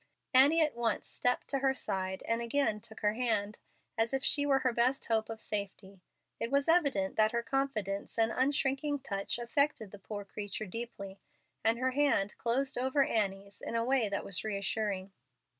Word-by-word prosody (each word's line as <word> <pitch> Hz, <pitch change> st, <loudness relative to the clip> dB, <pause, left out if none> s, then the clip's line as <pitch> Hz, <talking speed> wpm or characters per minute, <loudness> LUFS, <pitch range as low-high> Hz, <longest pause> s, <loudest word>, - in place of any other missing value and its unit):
Annie 285 Hz, +6 st, +6 dB
at 305 Hz, -1 st, +2 dB
once 235 Hz, -1 st, -1 dB
stepped 245 Hz, 0 st, 0 dB
to 275 Hz, -, 0 dB
her 265 Hz, 0 st, +2 dB
side 190 Hz, -5 st, -3 dB
and 230 Hz, +1 st, +1 dB
again 235 Hz, -2 st, +1 dB
took 220 Hz, 0 st, -9 dB
her 210 Hz, -1 st, +2 dB
hand, 220 Hz, -3 st, -1 dB, 0.4 s
as 230 Hz, +4 st, +2 dB
if 270 Hz, -, -2 dB
she 285 Hz, -1 st, +3 dB
were 275 Hz, -1 st, +4 dB
her 250 Hz, -, +3 dB
best 250 Hz, +3 st, +1 dB
hope 220 Hz, -1 st, 0 dB
of 225 Hz, -1 st, -6 dB
safety. 200 Hz, -2 st, -5 dB, 0.4 s
It 230 Hz, -, -2 dB
was 280 Hz, +1 st, +2 dB
evident 280 Hz, -, +2 dB
that 215 Hz, +1 st, +4 dB
her 235 Hz, 0 st, 0 dB
confidence 230 Hz, -7 st, -2 dB
and 225 Hz, 0 st, +3 dB
unshrinking 275 Hz, +2 st, 0 dB
touch 200 Hz, -6 st, -2 dB
affected 240 Hz, -3 st, 0 dB
the 205 Hz, -, -11 dB
poor 205 Hz, +1 st, -6 dB
creature 205 Hz, +1 st, -5 dB
deeply, 200 Hz, -2 st, -7 dB, 0.4 s
and 225 Hz, +2 st, +3 dB
her 260 Hz, +1 st, +1 dB
hand 260 Hz, -8 st, +2 dB
closed 260 Hz, +2 st, 0 dB
over 265 Hz, +2 st, +3 dB
Annie's 200 Hz, -4 st, -2 dB
in -, -, -4 dB
a 230 Hz, 0 st, +1 dB
way 255 Hz, -4 st, +2 dB
that 200 Hz, -, -2 dB
was 195 Hz, -, -3 dB
reassuring. 200 Hz, -1 st, -2 dB
230 Hz, 180 wpm, -32 LUFS, 205-270 Hz, 0.4 s, Annie